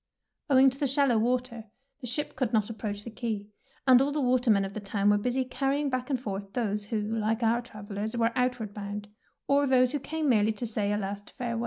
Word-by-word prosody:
Owing 265 -1 +6
to 270 - -8
the 285 - +2
shallow 270 -3 +3
water, 240 -1 -1 0.3
the 250 - -5
ship 295 +5 -1
could 255 -4 -1
not 215 0 +2
approach 210 -2 -4
the 235 - -8
quay, 215 -3 -4 0.4
and 255 -1 +7
all 280 +2 +1
the 300 - -1
watermen 245 -6 +3
of 195 - -7
the 215 - -4
town 200 0 +1
were 205 - +4
busy 250 +4 0
carrying 275 +2 -1
back 255 +1 -2
and 265 -3 0
forth 200 -4 -5
those 210 -4 -1
who, 215 +1 -2
like 220 +2 -1
our 230 +1 +3
travellers, 215 -1 -5
were 230 0 +2
outward 250 -4 -1
bound, 205 0 -6 0.4
or 280 0 +3
those 255 -1 +4
who 290 - -1
came 310 +3 -3
merely 220 -3 +3
to 225 +3 -5
say 215 -2 -1
a 210 - +1
last 205 0 -5
farewell. 235 -3 -2
235 Hz, 220 wpm, -28 LUFS, 210-255 Hz, 0.4 s, and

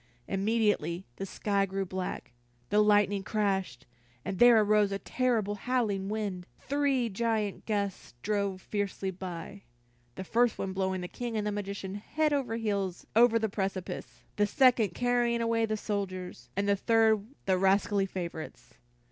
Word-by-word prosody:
Immediately 195 -4 0
the 195 - -4
sky 200 0 0
grew 195 +1 -2
black, 185 -7 -5 0.4
the 210 - +5
lightning 205 -1 +3
crashed, 190 - -1 0.4
and 195 -1 -3
there 240 -2 +8
arose 210 -1 +3
a 195 - -1
terrible, 225 -2 0
howling 205 -3 -1
wind. 205 -4 -3
Three 275 -3 0
giant 220 -1 -1
gusts 200 - -2
drove 200 -2 -1
fiercely 200 -2 -3
by, 185 +1 -7 0.5
the - - -5
first 235 +4 +2
one 190 -1 -3
blowing 190 -1 -1
the 180 - -4
King 235 +3 -4
and 210 - -1
the 210 - 0
magician 200 -1 -4
head 300 +9 0
over 265 -5 0
heels 200 -5 -2
over 230 0 +6
the 220 -1 +1
precipice, 195 -2 -4
the 205 0 +3
second 235 -6 +4
carrying 240 -1 +1
away 230 -1 +1
the 215 0 -1
soldiers, 185 - -4
and 200 0 +1
the 200 - +4
third 220 0 +3 0.2
the 185 -1 +2
rascally 195 +1 +2
favorites. 170 -4 -7
205 Hz, 150 wpm, -30 LUFS, 190-225 Hz, 0.5 s, there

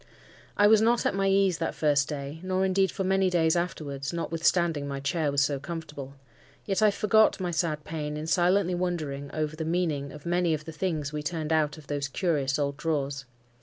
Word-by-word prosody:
I 205 - +5
was 215 0 +6
not 235 +2 +2
at - - +2
my 195 0 +1
ease 195 -3 +3
that 165 - -2
first 145 -2 +2
day, 145 +1 -5
nor 185 +1 0
indeed 190 0 +2
for 195 - -3
many 190 0 +2
days 165 -2 +2
afterwards, 140 -6 -3
notwithstanding 165 -2 0
my 140 -1 -4
chair 145 +2 0
was 140 0 +3
so 140 0 0
comfortable. 145 -3 -7 0.5
Yet 195 +1 0
I 215 - +6
forgot 210 +1 +3
my 180 -2 -2
sad 155 -2 -1
pain 150 -1 -4
in 155 - -5
silently 180 +2 +2
wondering 155 -6 -3
over 155 0 -2
the 160 - -4
meaning 160 -4 -1
of 150 -1 -12
many 175 -1 +1
of 150 0 -8
the 160 - -6
things 155 -3 -2
we 150 - -2
turned 160 0 -2
out 155 -1 +1
of 155 - -13
those 145 0 -2
curious 140 -3 0
old 140 -1 -1
drawers. 140 -4 -2
160 Hz, 205 wpm, -27 LUFS, 145-180 Hz, 0.5 s, was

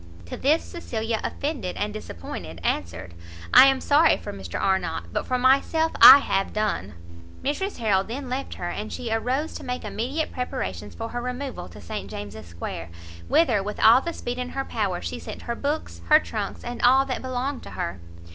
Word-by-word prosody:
To 85 - -6
this 300 +4 +2
Cecilia, 225 -9 -3
offended 280 - -3
and 210 0 -2
disappointed, 85 - -7
answered 85 -2 -2 0.4
"I 270 - +10
am 270 -1 +3
sorry 295 +4 +4
for - - -7
Mr 95 -3 -6
Arnott, 190 - -1
but - - -2
for 255 - +1
myself 275 +5 +3
I 265 - +13
have 195 -8 -1
done!" 200 - -2 0.5
Mrs 340 +9 -2
Harrel 205 -5 +2
then 255 +6 -6
left 260 +2 -4
her, 175 - -4
and 210 +4 -5
she 235 -3 -5
arose 255 +7 -1
to - - -7
make 250 -1 -4
immediate 275 +8 -2
preparations 105 - -4
for 225 0 -5
her 240 - -4
removal 250 - -5
to 85 - -12
St 95 +3 -6
James's 105 0 -8
square, 85 0 -6 0.4
whither, 245 -11 +3
with 210 +2 -5
all 230 +4 +7
the 335 - -3
speed 245 -6 -5
in 250 0 -3
her 270 +1 -3
power, 205 - -2
she 85 -1 -4
sent 85 - -8
her 235 - -3
books, 290 +6 -3
her 305 - +8
trunks, 215 -9 -5
and 240 0 -5
all 265 +2 +5
that 260 -2 -3
belonged 260 +2 -3
to - - -10
her. 85 +2 -3
235 Hz, 190 wpm, -25 LUFS, -, 0.5 s, I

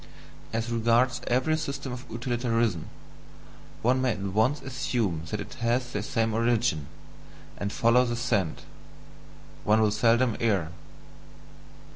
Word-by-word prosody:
As 115 +1 -2
regards 115 +2 +2
every 130 +6 +2
system 140 -3 -4
of 125 +1 -8
utilitarianism, 115 -6 -1 1.0
one 130 +3 +3
may 130 -3 +2
at - - -8
once 110 +9 +1
assume 120 - -1
that 105 - -3
it 105 - -7
has 120 +1 0
the 105 - -2
same 115 -2 0
origin, 115 - +1 0.7
and 100 0 -3
follow 115 +3 +4
the 120 -1 -1
scent: 110 - -1 1.0
one 105 +1 +4
will 110 -1 +3
seldom 115 +1 +3
err. 100 -8 +1
115 Hz, 125 wpm, -27 LUFS, 110-125 Hz, 1.0 s, follow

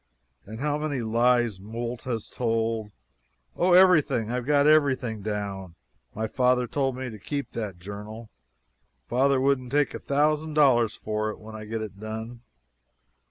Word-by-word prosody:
and 110 +2 -8
how 150 0 0
many 150 -3 -2
lies 120 -2 +2
Moult 115 +4 -5
has 115 -4 -3
told 115 -2 -1 0.7
Oh, 180 +1 +3
every 180 -3 +7
thing! 120 -6 -3
I've 125 0 -3
got 145 -1 +4
everything 130 -7 +3
down. 100 -4 -4 0.4
My 110 - -2
father 125 +2 +2
told 135 0 -1
me 130 -1 -5
to 110 - -10
keep 140 +4 -4
that 105 -6 -5
journal. 105 +4 -9 0.8
Father 135 +2 +2
wouldn't 130 -2 +1
take 145 0 +2
a - - -5
thousand 150 +2 0
dollars 120 -7 +4
for 110 0 -2
it 110 - -6
when 110 0 -11
I 110 0 -7
get 110 +1 -3
it 100 -2 -9
done." 110 +2 -6
120 Hz, 160 wpm, -26 LUFS, 110-140 Hz, 0.8 s, every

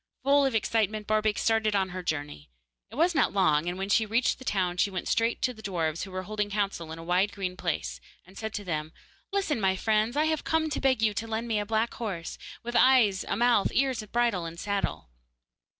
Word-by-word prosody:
Full 280 +1 +4
of 260 - -2
excitement, 215 -1 0
Barbaik 215 0 +1
started 220 -2 +2
on 190 -1 +1
her 185 +1 -5
journey. 145 - -4 0.4
It 225 - -11
was 335 +5 +3
not - - +2
long, 170 -4 +2
and 180 - -4
when 195 +1 -3
she 220 +1 +3
reached 230 +4 +1
the - - -10
town 185 -6 0
she 200 - +2
went 185 -2 -4
straight 230 +1 +1
to 250 - +1
the 220 - -13
dwarfs, 170 -5 -2
who 190 - -6
were 185 0 -4
holding 210 +1 -2
counsel 200 -5 -2
in 160 - -6
a 165 - -8
wide 180 +4 +2
green 185 -2 -4
place, 70 - -3 0.2
and 185 +2 -18
said 220 +1 -4
to 205 - -4
them, 155 -3 -3 0.4
'Listen, 390 - 0
my 190 -1 +2
friends! 220 +5 +1
I 305 - +3
have 315 -1 0
come 315 -1 0
to - - -2
beg 260 -4 +2
you 215 -1 +3
to 225 +3 -3
lend 225 +1 -3
me 220 -2 0
a 205 - -3
black 225 +1 0
horse, 190 -8 -5 0.2
with 240 +1 -5
eyes, 240 -7 +5
a - - -2
mouth, 240 -3 +3
ears, 265 -3 +1
bridle 215 -4 0
and 165 0 -7
saddle. 200 - -2
210 Hz, 230 wpm, -28 LUFS, 185-230 Hz, 0.4 s, eyes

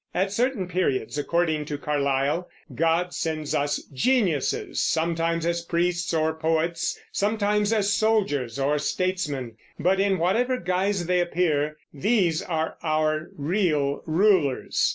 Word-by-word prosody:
At 190 +2 +1
certain 230 -3 0
periods, 150 -7 -1
according 160 -1 0
to 145 -1 -4
Carlyle, 140 +3 0 0.2
God 165 +5 +1
sends 155 -2 -2
us 145 0 +1 0.2
geniuses, 180 - +1
sometimes 165 0 0
as 170 0 0
priests 175 +1 0
or 160 -1 +1
poets, 165 +1 -1
sometimes 210 0 +1
as 205 -2 +2
soldiers 190 - +1
or 145 +2 +1
statesmen; 150 -9 -2 0.2
but 190 +2 +2
in 195 -1 +2
whatever 230 +9 +1
guise 185 -1 0
they 180 +1 +2
appear, 155 -4 0 0.2
these 170 - +1
are 160 -2 -2
our 155 -1 0
real 150 -3 0
rulers. 165 -5 +2
170 Hz, 125 wpm, -25 LUFS, 150-190 Hz, 0.2 s, as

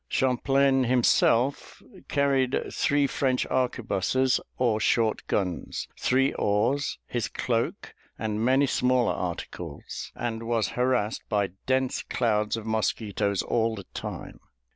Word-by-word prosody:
Champlain 135 0 +2
himself 125 +1 +2 0.2
carried 135 -2 +1
three 145 0 +2
French 135 -2 0
arquebuses 125 0 +1 0.2
or 115 -4 +2
short 110 0 +2
guns, 90 -4 -2
three 135 +1 +2
oars, 115 +7 0
his 120 -3 -2
cloak, 115 -2 -2 0.2
and 110 0 -2
many 130 +3 +4
smaller 125 -2 +2
articles; - - -6
and 115 -2 -3
was 115 -3 0
harassed 125 -3 0
by 100 -3 +1 0.2
dense 130 0 +1
clouds 105 -2 0
of 110 - -7
mosquitoes 105 -2 -1
all 115 -1 0
the 100 -3 -9
time. - - -7
120 Hz, 115 wpm, -27 LUFS, 110-130 Hz, 0.2 s, many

